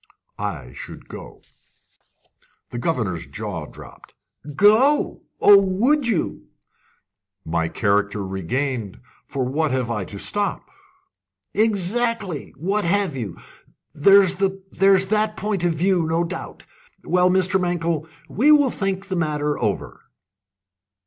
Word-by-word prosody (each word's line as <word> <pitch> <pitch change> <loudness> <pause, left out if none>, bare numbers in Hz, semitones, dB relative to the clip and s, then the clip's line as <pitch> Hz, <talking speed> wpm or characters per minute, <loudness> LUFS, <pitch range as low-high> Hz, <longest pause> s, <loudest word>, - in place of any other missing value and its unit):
"I 80 -12 -5
should - - -10
go." - - -11 1.3
The 120 - -4
governor's 115 - -2
jaw 100 -8 -6
dropped. - - -15 0.4
"Go? 225 - +4 0.2
Oh, 200 -1 +7
would 235 +9 +1
you!" 160 - -2 1.0
"My 80 0 -1
character 105 +1 0
regained, 105 - -3 0.3
for 135 -2 -2
what 150 +5 0
have 130 -3 -1
I 105 -4 -2
to 100 - -9
stop?" 205 - -3 0.8
"Exactly. 210 - 0
What 195 +6 0
have 190 -2 +1
you? 110 -9 -5 0.6
There's 195 +4 +5
that 195 +2 +2
point 205 -4 -2
of 175 -1 +2
view, 175 0 +1
no 165 +2 +1
doubt. 170 +2 -7 0.4
Well, 180 0 +3
Mankell, 175 -4 0 0.2
we 235 - +3
will 290 -4 +5
think 195 -1 -3
the 190 - -3
matter 150 -3 -1
over." 105 -4 -3
175 Hz, 110 wpm, -22 LUFS, 120-200 Hz, 1.3 s, Oh